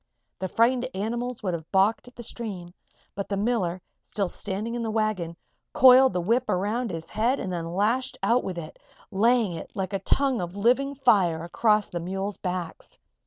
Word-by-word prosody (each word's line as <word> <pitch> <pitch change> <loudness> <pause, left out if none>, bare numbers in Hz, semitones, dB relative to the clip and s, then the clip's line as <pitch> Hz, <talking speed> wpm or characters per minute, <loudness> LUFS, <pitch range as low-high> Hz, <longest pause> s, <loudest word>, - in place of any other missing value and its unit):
The 190 - -2
frightened 245 +5 +2
animals 235 +4 -3
would 185 -3 -1
have 160 -2 -6
balked 200 +5 +2
at 245 - -15
the 240 - -8
stream, 195 -7 -6 0.4
but 200 0 -5
the 200 - -1
miller, 195 -5 -1 0.2
still 200 -3 -2
standing 210 +5 -4
in 240 - -3
the 225 - -2
wagon, 215 -7 -1 0.4
coiled 260 -2 +7
the 180 - 0
whip 230 +6 +1
around 210 +6 0
his 165 -2 -6
head 240 +5 +1
and 185 - -4
then 165 -1 -3
lashed 255 +6 0
out 245 +2 +3
with 185 -2 -4
it, 160 -2 -8 0.3
laying 225 +1 +3
it, 165 - -8
like 190 0 -3
a 195 - 0
tongue 265 +4 +1
of 175 +1 -5
living 255 +7 +2
fire, 180 -11 +3
across 210 +4 +2
the 175 - -4
mules' 190 +3 -4
backs. 180 -3 -5
210 Hz, 185 wpm, -26 LUFS, 185-240 Hz, 0.4 s, coiled